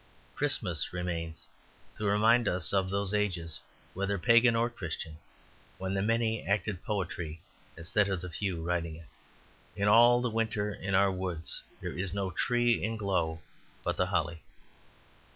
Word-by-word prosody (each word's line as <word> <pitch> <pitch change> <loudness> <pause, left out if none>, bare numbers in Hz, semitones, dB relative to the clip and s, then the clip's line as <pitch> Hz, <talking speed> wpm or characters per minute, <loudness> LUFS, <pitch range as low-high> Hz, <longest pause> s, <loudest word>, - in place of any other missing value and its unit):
Christmas 95 - 0
remains 85 -2 -4 0.5
to 105 - -4
remind 110 +4 +4
us 90 +1 +1
of 95 -1 +2
those 100 0 0
ages, 90 -6 -1 0.3
whether 100 +1 -1
Pagan 115 +4 +5
or 115 +1 +3
Christian, 85 -8 -6 0.6
when 95 0 -3
the 95 - 0
many 115 +1 +1
acted 100 -2 -1
poetry 90 -6 -3 0.4
instead 100 +5 +1
of 95 -2 -1
the 90 +1 -6
few 90 -1 -2
writing 85 -2 -1
it. 80 -3 -14 0.7
In 100 0 0
all 120 +3 +7
the 125 -1 -1
winter 110 -2 0
in 95 0 -2
our 100 0 +5
woods 90 -3 -3 0.2
there - - -4
is 95 +1 -3
no 95 -2 -1
tree 120 +5 +2
in 115 +1 -1
glow 85 -6 -1 0.4
but - - 0
the 90 - +1
holly. 85 -3 -1
95 Hz, 150 wpm, -30 LUFS, 85-110 Hz, 0.7 s, all